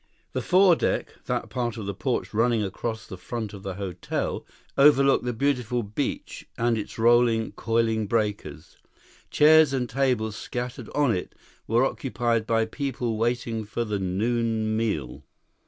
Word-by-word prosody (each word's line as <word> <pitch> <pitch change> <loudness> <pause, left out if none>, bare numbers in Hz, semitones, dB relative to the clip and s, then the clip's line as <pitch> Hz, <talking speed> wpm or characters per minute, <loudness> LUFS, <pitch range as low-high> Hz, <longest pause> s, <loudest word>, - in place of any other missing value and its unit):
The - - -1
fore 185 -1 +5
deck, - - -1
that - - -2
part 120 -2 -2
of 110 - -5
the 100 - -3
porch 125 +5 -2
running 115 0 +2
across 110 +2 -4
the 95 - -9
front 110 -2 -5
of 100 - -9
the 95 -2 -5
hotel, 90 -3 -4 0.3
overlooked 140 -2 +5
the 125 - 0
beautiful 125 -1 0
beach 105 +7 -4
and 120 0 +2
its 110 - -5
rolling, 115 -1 +3
coiling 115 -1 0
breakers. 105 -9 -2 0.5
Chairs 155 -1 +6
and 125 -2 0
tables 125 -5 0
scattered 125 0 -5
on 145 -7 +3
it 90 - -5 0.3
were 120 +4 +3
occupied 120 -4 -1
by 115 -1 +2
people 120 -1 -3
waiting 115 0 -1
for 110 +3 -3
the 105 -2 -2
noon 110 +3 0
meal. 105 - -2
115 Hz, 150 wpm, -25 LUFS, 110-125 Hz, 0.5 s, Chairs